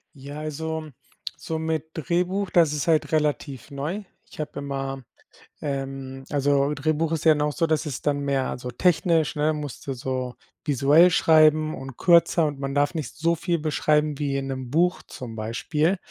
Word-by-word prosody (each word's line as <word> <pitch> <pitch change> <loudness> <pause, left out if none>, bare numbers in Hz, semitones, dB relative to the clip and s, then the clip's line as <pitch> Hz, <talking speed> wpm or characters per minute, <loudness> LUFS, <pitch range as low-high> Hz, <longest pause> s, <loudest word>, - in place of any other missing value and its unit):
Ja, 140 +2 -8
also, 155 +1 -4 0.5
so 160 -1 -4
mit 160 -1 -2
Drehbuch, 180 +4 -1
das 165 -4 +4
ist 150 +1 -2
halt 160 0 +2
relativ 150 -4 -1
neu. 150 +9 -4 0.3
Ich - - -10
habe 150 - -5
immer, 135 -1 -4 0.6
ähm 135 -2 -4
also 140 0 +2
Drehbuch 155 +2 0
ist 165 -1 -2
ja 160 - +8
dann 150 - -2
auch 150 0 +1
so, 165 - +1
dass 155 +1 +1
es 145 -5 -4
dann 145 -1 0
mehr 135 -2 0
also 125 0 -5
technisch, 165 +2 +2
ne, 155 +1 +2
musste 145 -2 -5
so 130 0 -3 0.3
visuell 145 +5 +5
schreiben 155 -1 +4
und 135 -1 -9
kürzer 170 -1 +4
und 145 -2 -5
man 135 0 -3
darf 145 +3 +2
nicht 155 -3 -4
so 165 +2 +1
viel 170 0 -1
beschreiben 150 -1 +1
wie 140 -1 -1
in 135 - -3
'nem 130 -2 -5
Buch 175 +3 +2
zum 120 -3 -9
Beispiel. 150 - 0
150 Hz, 175 wpm, -25 LUFS, 135-160 Hz, 0.6 s, ja